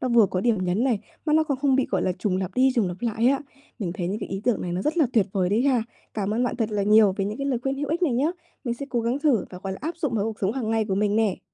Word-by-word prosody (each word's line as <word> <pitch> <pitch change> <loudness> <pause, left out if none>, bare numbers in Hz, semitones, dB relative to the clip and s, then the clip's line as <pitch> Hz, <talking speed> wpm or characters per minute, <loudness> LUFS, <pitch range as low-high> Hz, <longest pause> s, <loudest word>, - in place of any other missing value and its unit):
nó 255 - -1
vừa 235 -3 +5
có 185 - -2
điểm 215 -3 +1
nhấn 185 +7 +1
này, 240 -6 +2 0.3
mà 300 - +2
nó 315 - +5
còn 280 -4 -2
không 275 -2 +3
bị, 270 - +2
gọi - - +1
là, 185 - +1
trùng 185 -1 0
lặp 190 -1 -3
đi 260 +1 +4
trùng 225 -6 +2
lặp 175 - -5
lại 230 0 0
á. 270 +1 +3 0.4
Mình 185 -7 -3
thấy 180 -2 -3
những 205 - -2
cái - - -5
ý 195 0 -4
tưởng 245 - +2
này 175 - -3
nó 185 +2 -2
rất 315 +3 -1
là 300 - +5
tuyệt 215 -5 +3
vời 185 -2 +1
đấy 215 +5 +2
ha. 260 -5 +3 0.3
Cảm 210 0 -1
ơn 245 +2 +1
bạn 240 - -2
thật 225 -2 -1
là 205 -1 0
nhiều 210 -1 +5
về 195 - 0
những 210 +2 -4
cái 275 - -2
lời 255 -4 0
khuyên 270 0 0
hữu 285 +1 -3
ích 335 +4 -1
này 305 -8 +3
nhá. 275 +7 +2 0.3
Mình 240 -2 -1
sẽ 275 +3 -7
cố 240 - 0
gắng 235 +4 0
thử 285 - +2
và, 180 - -8
gọi 190 -1 -3
là, - - -7
áp 330 +3 -3
dụng 295 -8 -2
vào 205 -2 +1
cuộc 220 -1 -4
sống 195 +1 +1
hàng 235 -4 -2
ngày 225 -1 +2
của 195 -2 -1
mình 205 +1 +1
nè. 220 -4 +1
225 Hz, 350 wpm, -25 LUFS, 200-265 Hz, 0.4 s, vừa